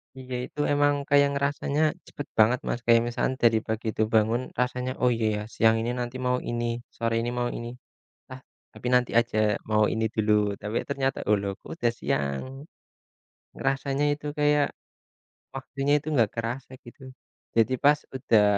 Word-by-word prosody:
Iya, 130 -1 -7
itu 150 - -13
emang 145 0 +3 0.2
kayak 145 0 +5
ngerasanya 140 +1 -1 0.3
cepat 145 - -7
banget, 120 +4 +5
Mas, 120 - -1
kayak 115 -1 +6
misalkan 130 +2 -1
dari 115 -1 +5
pagi 110 +1 -3
tuh 110 - +3
bangun 110 +2 +3 0.2
rasanya, 125 0 -1
"Oh, 125 - +4
iya, 115 - -1
ya 105 - -3
siang 110 0 +4
ini 120 - -1
nanti 120 +1 -4
mau 125 0 +2
ini, 120 0 -1 0.3
sore 115 0 -1
ini 120 - -2
mau 120 0 0
ini, 120 - -6 0.7
ah 130 - -10 0.3
tapi 125 - -6
nanti 125 -1 +3
aja 115 -2 -2 0.3
mau 110 0 +4
ini 110 0 0
dulu," 110 -1 +1 0.3
tapi 105 +2 -4
ternyata, 135 -2 -1
"Oh, 105 - +6
loh 100 0 -2
kok - - -14
udah 120 -1 +1
siang?" 70 -1 -1 1.1
Ngerasanya 135 +1 -1
itu 145 0 -9
kayak 150 -1 +4 0.9
waktunya 135 +1 -1
itu 150 - -16
nggak 115 -5 +4
kerasa 120 +3 -4
gitu. 120 +3 -14 0.5
Jadi 115 +3 +3
pas 145 +1 +5 0.2
udah 115 -4 +3
120 Hz, 170 wpm, -26 LUFS, 115-135 Hz, 1.1 s, kayak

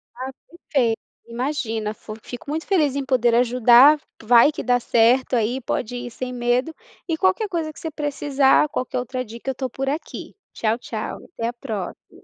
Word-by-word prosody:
Ah, 260 +2 -5 0.2
perfeito. 255 -9 0 0.3
Imagina 230 -4 -2
fu 215 0 -10
fico 245 +3 -9
muito 315 +2 -3
feliz 305 -8 +2
em 280 - -1
poder 245 -3 +2
ajudar, 250 +4 +6 0.2
vai 235 +4 +6
que - - -6
dá 245 0 +2
certo 240 +2 +3
aí, 240 +3 0
pode 240 0 -3
ir 245 0 -6
sem 250 +2 -5
medo. 245 +5 0 0.3
E 325 -2 -1
qualquer 380 +4 +1
coisa 325 -3 -2
que - - -14
você 320 - -5
precisar, 290 -1 +2
qualquer 255 -3 -3
outra 255 +1 -4
dica, 235 +4 -7
eu - - +2
estou 260 0 -4
por 270 +3 -3
aqui. 300 +4 -6 0.2
Tchau, 225 +1 0
tchau. - - -5
Até 230 - -3
a - - -6
próxi 220 -7 -7
255 Hz, 180 wpm, -22 LUFS, 235-290 Hz, 0.3 s, ajudar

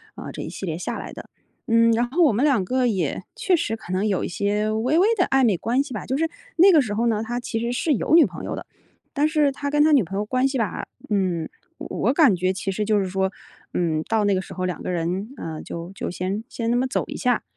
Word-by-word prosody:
呃， - - -7
这 - - -7
一 - - -6
系 - - -6
列 160 -3 -3
下 175 - -4
来 - - -7
的。 - - -10 0.4
嗯， 230 0 +5
然 235 +1 +1
后 340 +7 +3
我 290 - +4
们 235 +6 +1
2 265 -10 +3
个 255 +4 +1
也 200 -6 -1
确 485 -7 +2
实 225 -8 -1
可 185 -4 -8
能 190 +3 +1
有 195 -3 0
一 - - -1
些 205 +3 0
微 240 +8 +1
微 375 +4 +5
地 365 - +2
暧 270 -1 +3
昧 215 -5 +3
关 235 +9 0
系 280 -3 -9
吧， 210 - -4
就 265 - -2
是 325 +2 +1 0.3
那 370 +3 +7
个 320 -4 +6
时 210 -5 -3
候 230 +2 +1
呢， 220 -2 +1
他 240 +2 -3
其 225 -2 -3
实 235 +1 -2
是 290 +5 +1
有 285 +5 +2
女 335 - +8
朋 - - -7
友 - - -3
的。 - - -7 0.5
但 295 +1 +2
是 305 -2 +2
他 285 +1 -4
跟 295 +1 +3
他 310 - +4
女 280 -6 +5
朋 190 +3 -5
友 205 - -1
关 255 +4 +1
系 270 0 -2
吧， 225 -5 -2 0.2
嗯， 180 -5 0 0.3
我 230 - -1
感 280 - +5
觉 185 +1 0
其 195 +1 -3
实 210 +3 -2
就 210 0 +2
是 195 - -1
说， 190 +1 0 0.4
嗯， 160 -3 +1
到 220 -1 +2
那 200 - +3
个 185 - 0
时 - - -12
候 185 - -2
2 180 -1 -3
个 - - -4
人， 180 +4 -2
呃， 160 -1 -6
就 170 +2 -7
就 - - -4
先 190 +4 -3
先 230 -1 -2
那 - - +2
么 255 +2 +1
走 260 - -1
一 - - -7
下。 250 -3 +1
225 Hz, 285 characters per minute, -23 LUFS, 190-270 Hz, 0.5 s, 女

